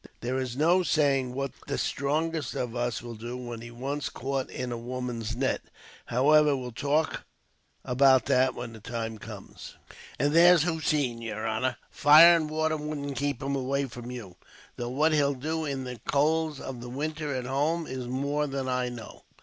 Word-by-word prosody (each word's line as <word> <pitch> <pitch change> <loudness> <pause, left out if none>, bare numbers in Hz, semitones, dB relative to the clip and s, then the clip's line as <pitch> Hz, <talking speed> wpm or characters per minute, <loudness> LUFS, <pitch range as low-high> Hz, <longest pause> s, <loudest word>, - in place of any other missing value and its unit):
There 125 +2 -1
is 130 -1 -4
no 170 +5 +4
saying 135 -7 +1
what 135 -1 -2 0.2
the - - -2
strongest 155 0 -1
of 120 -1 -3
us 120 -3 -2
will 120 -1 -7
do, 120 +3 -6
when 120 -2 -7
he's 120 0 -9
once 135 +4 -3
caught 135 0 -3
in 125 -1 -4
a 120 - -3
woman's 120 -2 -4
net. 130 +2 0 0.5
However, 145 +3 +4
we'll 125 -1 -6
talk 145 +6 0 0.6
of 125 0 -3
that 130 -1 +5
when 120 -1 -6
the 110 - -10
time 115 0 -5
comes." - - -10 0.4
"And 145 +3 +1
there's 170 -1 +7
Hossein, 150 -7 0
yer 110 -1 -4
honor. 115 +4 -1
Fire 160 +3 +8
and 155 -2 0
water 155 0 0
wouldn't 150 -2 -4
keep 140 -3 -2
him 140 +1 -1
away 135 +1 0
from 120 -1 -8
you, 115 -8 -8 0.4
though 120 0 -4
what 150 +5 +2
he'll 145 -2 +2
do 155 +4 -2
in 135 -2 -3
the 125 -2 -7
colds 155 +1 +1
of 130 -3 -7
the 120 - -7
winter 150 +2 -3
at 125 -1 -3
home 150 +6 0
is 130 -3 -5
more 140 +4 -1
than 135 -1 -3
I 125 -1 0
know. 120 -2 -9
135 Hz, 180 wpm, -28 LUFS, 125-150 Hz, 0.6 s, Fire